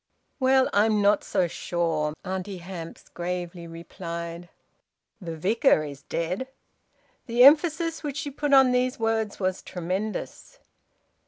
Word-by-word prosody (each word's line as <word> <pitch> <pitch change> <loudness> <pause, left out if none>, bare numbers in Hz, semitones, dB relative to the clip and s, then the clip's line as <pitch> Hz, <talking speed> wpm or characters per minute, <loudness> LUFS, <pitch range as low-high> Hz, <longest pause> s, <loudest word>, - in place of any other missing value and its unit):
"Well, 260 0 +4
I'm 210 +1 +3
not 205 0 +3
so 180 - +1
sure," 165 -3 -2
Auntie 190 +1 -4
Hamps 175 -2 -9
gravely 175 -1 -5
replied. 170 0 -7 0.7
"The 165 -3 -6
Vicar 200 - +3
is 145 -2 -8
dead." 180 +10 -3 0.8
The 240 +1 +4
emphasis 320 +3 +5
which 290 -2 -4
she 295 -2 -4
put 290 +1 -2
on 265 -2 +7
these 250 0 +1
words 225 -2 -1
was 185 -1 -1
tremendous. 185 +5 -5
190 Hz, 120 wpm, -26 LUFS, 170-250 Hz, 0.8 s, on